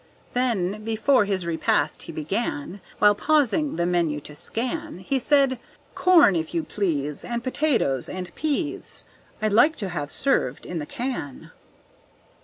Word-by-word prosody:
Then, 215 Hz, -5 st, 0 dB
before 225 Hz, +2 st, +3 dB
his 190 Hz, -3 st, -1 dB
repast 165 Hz, -1 st, 0 dB
he -, -, -8 dB
began, 170 Hz, +2 st, -3 dB, 0.2 s
While 205 Hz, 0 st, +6 dB
pausing 295 Hz, +4 st, +2 dB
the 170 Hz, +1 st, 0 dB
menu 170 Hz, -4 st, +1 dB
to 150 Hz, -, -11 dB
scan, 255 Hz, -, -4 dB
He 225 Hz, +9 st, -1 dB
said: 270 Hz, -1 st, +3 dB, 0.3 s
"Corn, 335 Hz, -, +5 dB
if 160 Hz, 0 st, -2 dB
you 165 Hz, -, +1 dB
please, 150 Hz, -6 st, -2 dB
And 235 Hz, 0 st, -3 dB
tomatoes 255 Hz, -, 0 dB
and 180 Hz, -1 st, -6 dB
pease, 305 Hz, +1 st, -3 dB, 0.4 s
I'd 215 Hz, -1 st, +1 dB
like 295 Hz, +9 st, +5 dB
to 195 Hz, -, -4 dB
have 145 Hz, -5 st, -4 dB
served 145 Hz, -, 0 dB
in 175 Hz, -, -4 dB
the 150 Hz, -, -5 dB
can." 240 Hz, -, -5 dB
210 Hz, 145 wpm, -24 LUFS, 170-265 Hz, 0.4 s, While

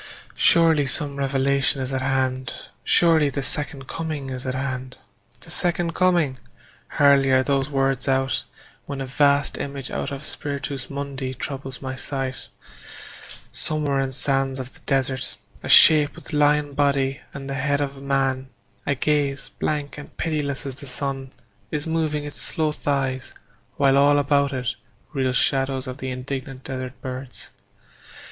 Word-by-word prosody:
Surely 160 Hz, -4 st, +5 dB
some 140 Hz, +2 st, -2 dB
revelation 140 Hz, 0 st, +2 dB
is 130 Hz, 0 st, -3 dB
at 130 Hz, -, -1 dB
hand; 130 Hz, -1 st, 0 dB, 0.3 s
Surely 160 Hz, -4 st, +4 dB
the 140 Hz, 0 st, -3 dB
Second 140 Hz, -1 st, -2 dB
Coming 155 Hz, -5 st, -4 dB
is 130 Hz, 0 st, -4 dB
at 130 Hz, -, -1 dB
hand. 130 Hz, -1 st, -4 dB, 0.4 s
The -, -, -11 dB
Second 175 Hz, -1 st, +2 dB
Coming! 170 Hz, -8 st, +2 dB, 0.5 s
Hardly 140 Hz, -2 st, +4 dB
are 130 Hz, 0 st, +4 dB
those 135 Hz, 0 st, 0 dB
words 135 Hz, -2 st, 0 dB
out 135 Hz, 0 st, +1 dB, 0.4 s
When 140 Hz, -1 st, -4 dB
a 135 Hz, -, -3 dB
vast 140 Hz, +2 st, +2 dB
image 140 Hz, -2 st, -5 dB
out -, -, -3 dB
of 140 Hz, +1 st, -6 dB
Spiritus 140 Hz, -3 st, -3 dB
Mundi 140 Hz, -2 st, -4 dB
Troubles 135 Hz, -1 st, -6 dB
my 130 Hz, 0 st, -3 dB
sight: 135 Hz, 0 st, -3 dB, 1.0 s
somewhere 150 Hz, -3 st, 0 dB
in 135 Hz, -1 st, -1 dB
sands 135 Hz, 0 st, 0 dB
of 130 Hz, 0 st, -6 dB
the -, -, -17 dB
desert 130 Hz, -1 st, 0 dB, 0.2 s
A -, -, -6 dB
shape 150 Hz, -2 st, +8 dB
with -, -, -11 dB
lion 150 Hz, 0 st, +3 dB
body 140 Hz, -1 st, +1 dB
and 135 Hz, -1 st, -7 dB
the 140 Hz, -, -3 dB
head 140 Hz, +1 st, 0 dB
of 140 Hz, -1 st, -2 dB
a -, -, -11 dB
man, 135 Hz, -1 st, 0 dB, 0.4 s
A 140 Hz, -, +2 dB
gaze 140 Hz, 0 st, 0 dB
blank 150 Hz, -1 st, -3 dB
and 145 Hz, -, -12 dB
pitiless 150 Hz, -4 st, -1 dB
as 135 Hz, -, -4 dB
the 140 Hz, -1 st, -8 dB
sun, 135 Hz, 0 st, -2 dB, 0.4 s
Is 150 Hz, -1 st, -3 dB
moving 160 Hz, -2 st, -1 dB
its 145 Hz, 0 st, -4 dB
slow 155 Hz, -1 st, 0 dB
thighs, 135 Hz, -3 st, -2 dB, 0.4 s
while 140 Hz, 0 st, +4 dB
all 145 Hz, +1 st, +5 dB
about 140 Hz, 0 st, +2 dB
it 130 Hz, -2 st, -2 dB, 0.4 s
Reel 130 Hz, -3 st, +1 dB
shadows 135 Hz, +1 st, +1 dB
of 130 Hz, +1 st, -7 dB
the 130 Hz, -, -4 dB
indignant 130 Hz, +1 st, -5 dB
desert 130 Hz, -1 st, -5 dB
birds. 130 Hz, 0 st, -7 dB
135 Hz, 155 wpm, -23 LUFS, 130-145 Hz, 1.0 s, shape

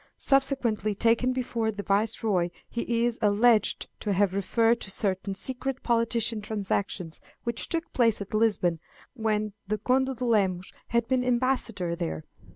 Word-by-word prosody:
Subsequently 255 Hz, -7 st, +1 dB
taken 230 Hz, +4 st, +2 dB
before 240 Hz, -3 st, -1 dB
the 205 Hz, -1 st, -6 dB
Viceroy, 200 Hz, -3 st, +1 dB, 0.2 s
he 235 Hz, 0 st, -1 dB
is 240 Hz, -1 st, -1 dB
alleged 215 Hz, +2 st, +3 dB
to 205 Hz, -, -1 dB
have 195 Hz, 0 st, +2 dB
referred 225 Hz, +4 st, +2 dB
to -, -, -6 dB
certain 195 Hz, 0 st, -1 dB
secret 260 Hz, +5 st, -3 dB
political 230 Hz, -2 st, +1 dB
transactions 200 Hz, -5 st, -3 dB, 0.2 s
which 235 Hz, 0 st, -2 dB
took 330 Hz, -1 st, -3 dB
place 230 Hz, -3 st, +3 dB
at 200 Hz, 0 st, -7 dB
Lisbon 205 Hz, -6 st, +2 dB, 0.3 s
when 215 Hz, -3 st, -1 dB
the 215 Hz, +1 st, 0 dB
Conde 260 Hz, +4 st, +1 dB
de 250 Hz, +1 st, -3 dB
Lemos 190 Hz, -6 st, +1 dB
had 235 Hz, -1 st, +1 dB
been 255 Hz, 0 st, +1 dB
ambassador 240 Hz, -8 st, 0 dB
there. 80 Hz, -, -4 dB
225 Hz, 145 wpm, -27 LUFS, 200-240 Hz, 0.3 s, alleged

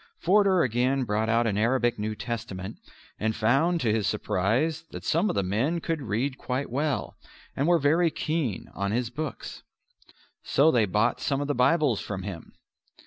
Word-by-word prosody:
Forder 190 Hz, -1 st, +3 dB
again 130 Hz, +3 st, +1 dB
brought 110 Hz, 0 st, -1 dB
out 115 Hz, +1 st, +3 dB
an 105 Hz, -2 st, 0 dB
Arabic 120 Hz, 0 st, +1 dB
New 110 Hz, +1 st, -2 dB
Testament 110 Hz, -3 st, -5 dB, 0.4 s
and 110 Hz, 0 st, 0 dB
found 140 Hz, +10 st, +2 dB
to 110 Hz, -3 st, +2 dB
his 110 Hz, -2 st, 0 dB
surprise 125 Hz, -, 0 dB
that -, -, -9 dB
some 170 Hz, +6 st, +2 dB
of -, -, -2 dB
the 100 Hz, -, +1 dB
men 120 Hz, -, 0 dB
could 165 Hz, -1 st, -3 dB
read 130 Hz, +3 st, -2 dB
quite 130 Hz, 0 st, -3 dB
well 145 Hz, +2 st, -2 dB, 0.4 s
and 140 Hz, -, 0 dB
were 175 Hz, 0 st, +5 dB
very 165 Hz, +3 st, +3 dB
keen 155 Hz, -, -2 dB
on 100 Hz, +1 st, -2 dB
his 120 Hz, +1 st, -1 dB
books. 145 Hz, -2 st, -6 dB, 0.8 s
So 155 Hz, +4 st, +3 dB
they 115 Hz, -6 st, +3 dB
bought 105 Hz, +5 st, +1 dB
some 140 Hz, -1 st, 0 dB
of 145 Hz, -, -2 dB
the 145 Hz, -, 0 dB
Bibles 130 Hz, -2 st, +2 dB
from 95 Hz, -2 st, -5 dB
him. 90 Hz, -5 st, -8 dB
125 Hz, 175 wpm, -27 LUFS, 110-150 Hz, 0.8 s, were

